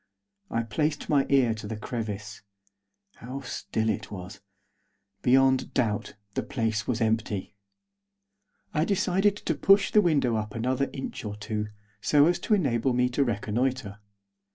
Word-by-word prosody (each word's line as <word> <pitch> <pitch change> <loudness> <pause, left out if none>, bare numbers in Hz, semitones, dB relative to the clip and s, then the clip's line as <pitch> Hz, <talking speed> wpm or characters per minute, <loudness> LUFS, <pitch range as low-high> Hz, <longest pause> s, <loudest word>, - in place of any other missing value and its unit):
I 115 - 0
placed 150 +7 -1
my 140 -2 +3
ear 130 -5 +4
to 110 -1 -7
the 110 0 -4
crevice. 110 -2 -5 0.8
How 130 +3 -7
still 110 -3 -3
it 110 - -1
was! 100 +1 -8 0.8
Beyond 130 +1 +3
doubt, 110 -5 0 0.2
the - - 0
place 110 -4 -2
was 120 -2 -1
empty. 110 -3 -1 1.2
I 155 - +2
decided 195 +2 +2
to 165 - -1
push 195 +7 +4
the 210 - +6
window 140 - +2
up 105 -1 -4
another 130 +4 0
inch 135 - -6
or 105 -1 -4
two, 105 0 -3 0.3
so 145 +7 +5
as 175 +2 +2
to 215 - +2
enable 130 - +1
me 125 0 +2
to 135 +3 +1
reconnoitre. 115 -1 -1
125 Hz, 145 wpm, -27 LUFS, 110-140 Hz, 1.2 s, the